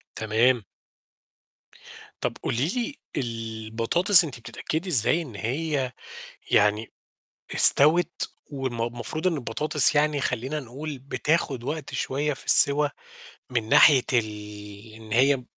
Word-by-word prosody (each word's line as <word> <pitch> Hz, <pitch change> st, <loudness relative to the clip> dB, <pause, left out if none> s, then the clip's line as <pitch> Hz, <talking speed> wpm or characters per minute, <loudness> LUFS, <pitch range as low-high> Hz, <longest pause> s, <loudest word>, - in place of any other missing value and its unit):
تمام. 115 Hz, +2 st, 0 dB, 1.6 s
طب -, -, -4 dB
قولي 125 Hz, +6 st, -2 dB
لي 245 Hz, -, -4 dB, 0.2 s
البطاطس 115 Hz, -, +1 dB
أنتِ 140 Hz, -7 st, -9 dB
بتتأكدي 155 Hz, -, -6 dB
إزاي 155 Hz, +3 st, +2 dB
إن 130 Hz, -10 st, -11 dB
هي 135 Hz, +4 st, -4 dB, 0.6 s
يعني 105 Hz, +2 st, 0 dB, 0.6 s
استوِت 165 Hz, +5 st, +5 dB, 0.3 s
والم 130 Hz, -4 st, -6 dB
المفروض 120 Hz, +8 st, -4 dB
إن 180 Hz, -, 0 dB
البطاطس 150 Hz, +4 st, +3 dB
يعني 150 Hz, -1 st, 0 dB
خلّينا 130 Hz, +5 st, -4 dB
نقول 140 Hz, +3 st, -9 dB
بتاخد 140 Hz, -1 st, -3 dB
وقت 150 Hz, +2 st, -7 dB
شوية 145 Hz, +3 st, -3 dB
في -, -, -11 dB
السِوَى 145 Hz, +1 st, +8 dB, 0.6 s
من 115 Hz, -3 st, -4 dB
ناحية 145 Hz, -2 st, +5 dB
ال 105 Hz, -1 st, -6 dB
إن 110 Hz, -1 st, -14 dB
هي 130 Hz, +1 st, +1 dB
130 Hz, 110 wpm, -23 LUFS, 115-150 Hz, 1.6 s, السِوَى